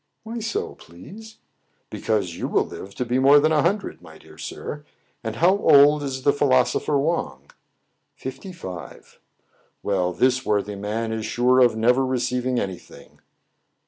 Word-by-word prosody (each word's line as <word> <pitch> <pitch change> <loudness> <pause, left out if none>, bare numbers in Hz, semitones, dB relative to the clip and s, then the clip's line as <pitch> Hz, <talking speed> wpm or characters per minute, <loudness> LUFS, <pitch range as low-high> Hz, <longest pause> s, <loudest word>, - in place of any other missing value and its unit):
" - - -53
Why 230 +1 -6
so, 225 +1 -3
please? 205 - -13 0.2
" - - -46
" - - -45
Because 100 -6 -1
you - - -3
will - - +1
live 100 +1 -10
to 125 - -2
be 125 +2 0
more 140 +2 +7
than 155 +2 +2
a 155 -1 +3
hun 185 +7 +2
dred, 200 - -10
my - - -14
dear - - -17
sir. 150 0 -7 0.4
And 110 -1 -4
how 175 +8 +4
old 145 -1 +6
is 130 -2 -4
the 145 - +4
philosopher 140 +1 +2
Wang? 140 - -2 0.3
" - - -47 0.3
"Fifty 135 +8 -8
five." 90 - -10 0.3
" - - -39
Well, 90 -3 0
this 130 +7 +1
worthy 105 -2 -1
man 110 +3 -3
is 110 -1 -3
sure 125 +1 +3
of 120 -3 +5
never 120 +4 +3
receiv 125 -1 -1
ing 125 -1 +1
any 95 -2 -4
thing." - - -17
130 Hz, 185 wpm, -23 LUFS, 110-145 Hz, 0.4 s, more